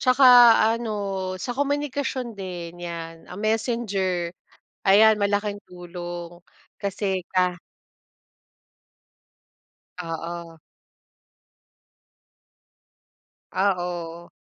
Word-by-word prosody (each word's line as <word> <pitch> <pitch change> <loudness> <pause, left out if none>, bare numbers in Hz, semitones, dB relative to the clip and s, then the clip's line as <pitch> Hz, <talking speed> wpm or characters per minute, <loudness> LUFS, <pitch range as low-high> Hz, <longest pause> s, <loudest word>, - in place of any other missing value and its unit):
Tsaka 255 +1 +4 0.6
ano, 200 -4 -3
sa 245 +7 -4
komunikasyon 280 -2 -2
din 175 -4 -7
'yan, 165 -1 -7
ah, 180 - -9
Messenger, 205 -5 -1 0.5
ayan 215 +3 +6
malaking 205 0 -1
tulong. 175 -1 -8 0.3
Kasi 195 -2 -2
ka 180 -1 +1 2.4
Oo. 165 0 -6 2.9
Oo. 175 -3 -2
190 Hz, 60 wpm, -24 LUFS, 175-215 Hz, 2.9 s, ayan